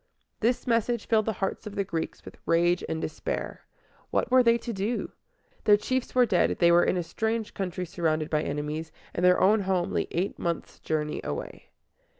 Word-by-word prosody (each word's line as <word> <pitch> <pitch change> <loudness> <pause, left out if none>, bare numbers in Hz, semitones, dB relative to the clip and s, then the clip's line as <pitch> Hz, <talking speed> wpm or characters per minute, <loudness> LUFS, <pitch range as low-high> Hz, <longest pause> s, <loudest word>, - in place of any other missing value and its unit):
This 240 +3 +1
message 235 -1 +1
filled 220 -1 +2
the 220 - +1
hearts 195 +2 -3
of 205 - -7
the 200 - +1
Greeks 165 -4 -4
with - - -11
rage 175 +1 +3
and 160 - -2
despair. 475 - -4 0.4
What - - 0
were 255 0 +7
they 235 -1 +4
to 235 0 -5
do? 205 +4 -2 0.5
Their 205 -1 +7
chiefs 255 +5 -2
were 250 -1 +6
dead, 195 -6 +2
they 170 0 +5
were 175 +1 +6
in - - +1
a 175 - 0
strange 220 +6 -2
country 185 -2 -3
surrounded 160 -3 -1
by 155 -1 +2
enemies, 150 +2 -3 0.2
and 175 - -2
their 180 0 +5
own 210 +4 +5
home 185 -3 0
lay - - 0
eight 180 +4 -2
months' 170 -1 -3
journey 150 -1 -2
away. 70 - -6
190 Hz, 190 wpm, -27 LUFS, 165-220 Hz, 0.5 s, were